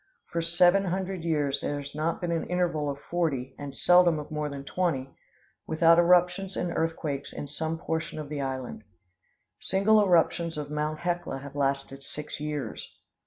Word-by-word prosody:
For 170 - 0
seven 175 +3 +4
hundred 185 -1 -2
years 145 -4 0
there 145 - -2
has 140 0 -8
not 155 +3 -1
been 175 -1 -1
an 165 -1 -1
interval 175 -5 0
of 140 - -3
forty, 145 -7 -2
and 140 -1 -6
seldom 175 -1 +5
of 150 0 -7
more 150 -1 -2
than 140 -1 -6
twenty, 140 -5 -1 0.6
without 165 +1 +5
eruptions 180 +2 +3
and 175 -1 -2
earthquakes 155 -4 -2
in 145 - -6
some 160 +3 -3
portion 160 -1 -3
of 155 -1 -5
the 145 -1 -4
island. 130 -4 -4 0.8
Single 210 +3 +4
eruptions 170 -3 +2
of 145 -1 -5
Mt. 150 +1 -2
Hecla 175 -5 -2
have 140 +1 -9
lasted 135 -1 -1
six 150 +1 -7
years. 150 -6 -5
160 Hz, 165 wpm, -28 LUFS, 145-175 Hz, 0.8 s, seldom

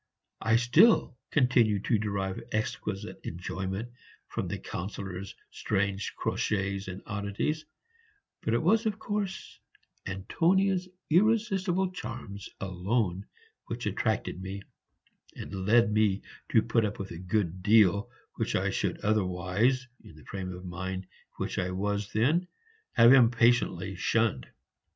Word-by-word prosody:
I 110 +1 +3
still 125 - +5
continued 120 -7 +3
to 115 - +2
derive 100 -2 -2
exquisite 105 -1 -3
enjoyment 95 +5 -4 0.4
from - - -3
the - - -3
Councillor's 95 0 -6 0.2
strange 100 -1 -1
crotchets 100 -1 -1
and 95 +1 -7
oddities; 105 +9 -2 0.8
but 115 - 0
it 120 - +1
was 220 +6 +3
of 210 - -1
course 205 -2 -4 0.5
Antonia's 180 - +1 0.2
irresistible 190 -1 +2
charms 115 - -7
alone 95 +1 -1 0.4
which - - -4
attracted 90 - -1
me, 95 +1 -6 0.7
and 95 -1 -5
led 115 0 +5
me 105 -2 +2 0.3
to 110 - +4
put 115 0 +2
up 105 -1 -2
with 100 0 -6
a 85 - -7
good 95 -1 -1
deal 105 +1 +4 0.3
which - - -1
I - - +1
should - - -1
otherwise, 105 +5 +1 0.2
in 80 - -14
the 75 - -16
frame 95 -2 -5
of 90 0 -8
mind 95 +1 -4
in 95 - -28 0.3
which - - -2
I 90 - 0
then 90 0 -3
was, 100 +1 -1 0.8
have 115 +2 +8
impatiently 115 -6 +4
shunned. 110 - +1
105 Hz, 125 wpm, -29 LUFS, 95-120 Hz, 0.8 s, have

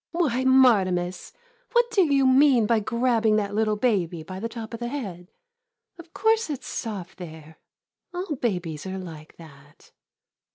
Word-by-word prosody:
] - - -69
Why, 280 -8 0
Martimas, 190 -9 +3 0.4
what 480 -1 +3
do 360 -7 +3
you 275 -1 +3
mean 260 -3 +5
by 225 +1 +2
grabbing 230 0 +1
that 205 -1 -1
little 215 0 +1
baby 185 -8 0
by 185 +3 -8
the 230 +3 -4
top 230 -1 -8
of 230 - -5
the 240 - -3
head? 195 -10 -6 0.7
Of 335 -1 -13
course 445 -1 +1
it 285 -4 -4
's - - -9
soft 195 -6 -6
there 160 -2 -11 0.2
— - - -63
all 355 -3 -4
babies 180 - -3
are 190 0 -4
like 160 -4 -10
that. 145 -3 -17
220 Hz, 170 wpm, -25 LUFS, 180-260 Hz, 0.7 s, mean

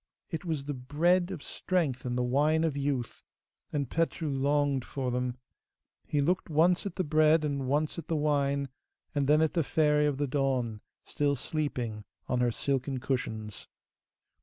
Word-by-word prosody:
It 160 +1 -4
was 155 -5 -2
the 145 - -2
bread 165 +8 +2
of 180 -6 -6
strength 155 -10 -1
and 125 0 -1
the 125 - +1
wine 150 +6 +2
of 160 -4 0
youth, 140 -4 -2 0.5
and 140 -3 -1
Petru 160 +1 -1
longed 140 -1 +1
for 130 -1 -3
them. 125 0 -1 0.7
He 150 - 0
looked 175 +6 +1
once 170 +5 +3
at - - -7
the 185 - 0
bread 155 0 +4
and 140 -3 -2
once 150 +4 0
at 165 - -9
the 165 - 0
wine, 140 -2 +1 0.4
and 140 -2 +1
then 150 +2 +5
at 160 - +1
the 165 - +2
Fairy 150 0 +3
of 145 -2 0
the 145 - 0
Dawn, 130 -5 0 0.2
still 145 -1 0
sleeping 125 -7 -3 0.2
on 125 - 0
her 125 -1 +2
silken 135 +1 -1
cushions. 110 -5 -3
145 Hz, 170 wpm, -30 LUFS, 130-155 Hz, 0.7 s, then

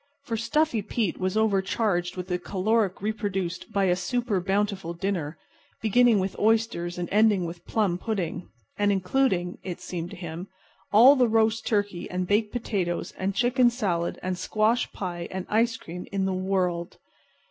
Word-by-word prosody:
For 235 -5 -3
Stuffy 240 +2 +1
Pete 210 -1 -2
was 185 +2 -1
overcharged 195 -3 +1
with 180 0 -4
the 180 0 0
caloric 200 +2 0 0.2
produced 190 -4 -3
by 200 - +1
a 180 -2 +3
super 235 +2 -1
bountiful 195 -2 -1
dinner, 170 -4 -2 0.4
beginning 230 +1 +4
with 190 0 -1
oysters 220 -6 +1
and 175 -1 -3
ending 210 -3 +4
with 170 +1 -8
plum 195 -5 +1
pudding, 185 -5 -3 0.3
and 205 0 +3
including 185 -2 0
(it 180 -2 -6
seemed 175 -2 -5
to - - -9
him) 170 +1 -7 0.4
all 245 +7 +8
the 250 -3 +4
roast 225 0 +2
turkey 205 -5 -1
and 180 0 -2
baked 210 +3 +1
potatoes 190 -7 -2
and 190 +1 -1
chicken 245 +2 +4
salad 190 -9 -1
and 185 -1 -2
squash 215 +5 +1
pie 175 -3 -5
and 185 -1 -5
ice 230 +2 +2
cream 180 +2 -8
in 195 -1 0
the 190 - 0
world. 185 -2 -1
195 Hz, 160 wpm, -26 LUFS, 180-220 Hz, 0.4 s, all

